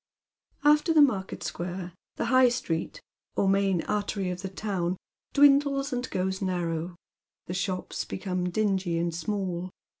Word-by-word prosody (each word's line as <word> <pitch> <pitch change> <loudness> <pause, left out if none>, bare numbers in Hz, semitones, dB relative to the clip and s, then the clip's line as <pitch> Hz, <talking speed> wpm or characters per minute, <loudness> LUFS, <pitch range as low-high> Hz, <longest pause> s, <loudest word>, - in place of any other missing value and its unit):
After 300 +3 +4
the 305 - +8
market 195 -9 0
Bquare 175 0 -4 0.2
the - - -2
high 255 -1 +7
street, 240 - -3 0.3
or 195 - +2
main 195 -3 +2
artery 200 -2 -1
of 180 0 -5
the 190 - -4
town, 185 -2 -2 0.3
dwindles 280 -1 +4
and 250 0 -2
grows 190 +1 -1
narrow. 175 -2 -2 0.5
The 180 - -5
shops 185 -1 -2
become 180 -1 -3
dingy 190 -3 0
and 170 0 0
small. 180 +1 -2
190 Hz, 140 wpm, -28 LUFS, 180-220 Hz, 0.5 s, the